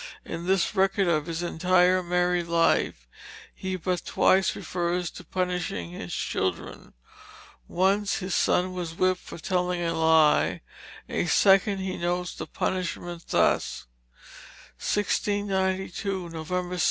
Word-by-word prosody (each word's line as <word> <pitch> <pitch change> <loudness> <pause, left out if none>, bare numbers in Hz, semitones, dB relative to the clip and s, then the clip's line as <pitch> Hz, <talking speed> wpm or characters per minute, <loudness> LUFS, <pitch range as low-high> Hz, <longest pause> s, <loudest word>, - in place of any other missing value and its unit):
In 170 +2 -6
this 190 +1 +2
record 195 0 +2
of 155 -2 +1
his 165 +1 -3
entire 180 +2 +3
married 180 0 0
life 165 - +1 0.5
he 190 0 -4
but 180 -1 -2
twice 190 0 +3
refers 175 -1 -2
to - - -11
punishing 180 - -3
his 90 0 -7
children; 95 -2 -3 0.7
once 195 +3 +1
his 185 -1 -3
son 185 +1 +2
was 175 -3 -5
whipped 185 +1 +1
for - - -10
telling 180 +1 -1
a 165 0 0
lie, 155 - +3 0.5
a - - -1
second 195 +1 +4
time 190 - -4
he 185 - -3
notes 175 0 -2
the - - -7
punishment 175 -2 -3
thus: - - +1 0.9
"1692, 190 -2 -1
Nov. 160 -1 -7 0.2
6. 180 - -3
180 Hz, 130 wpm, -26 LUFS, 170-190 Hz, 0.9 s, second